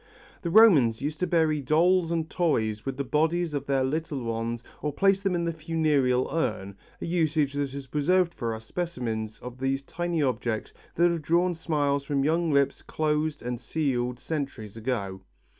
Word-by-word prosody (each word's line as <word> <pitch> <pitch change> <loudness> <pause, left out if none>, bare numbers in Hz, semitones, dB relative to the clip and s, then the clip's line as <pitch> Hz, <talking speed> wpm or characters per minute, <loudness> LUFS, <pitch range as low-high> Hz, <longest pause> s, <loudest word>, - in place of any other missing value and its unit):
The 170 - -2
Romans 165 - +6
used 150 +1 -3
to 180 - 0
bury 160 -3 +2
dolls 165 +5 +3
and 165 -2 -1
toys 110 -11 0
with 135 - -3
the 140 - -1
bodies 160 +4 +1
of 140 -1 -3
their 135 -1 +2
little 145 -1 -2
ones 115 +1 -3 0.2
or 150 - -1
place 195 +6 +3
them 195 -2 0
in 170 0 0
the 170 - -1
funereal 155 -6 +1
urn, 105 -11 -2 0.2
a - - -4
usage 155 -4 +1
that 145 -1 -1
has 140 +1 -7
preserved 170 +6 +2
for 115 -2 -3
us 110 0 -10
specimens 115 -9 -3
of 125 0 -8
these 135 +1 -1
tiny 170 +1 -2
objects 120 -4 -2 0.2
that 175 +1 +4
have 170 -2 -2
drawn 175 +4 +2
smiles 145 -4 0
from 140 -1 0
young 165 +2 +1
lips 140 -1 +2
closed 155 0 -1
and 120 -1 -3
sealed 125 -6 -1
centuries 135 -8 -5
ago. 110 -5 -3
145 Hz, 175 wpm, -27 LUFS, 125-165 Hz, 0.2 s, Romans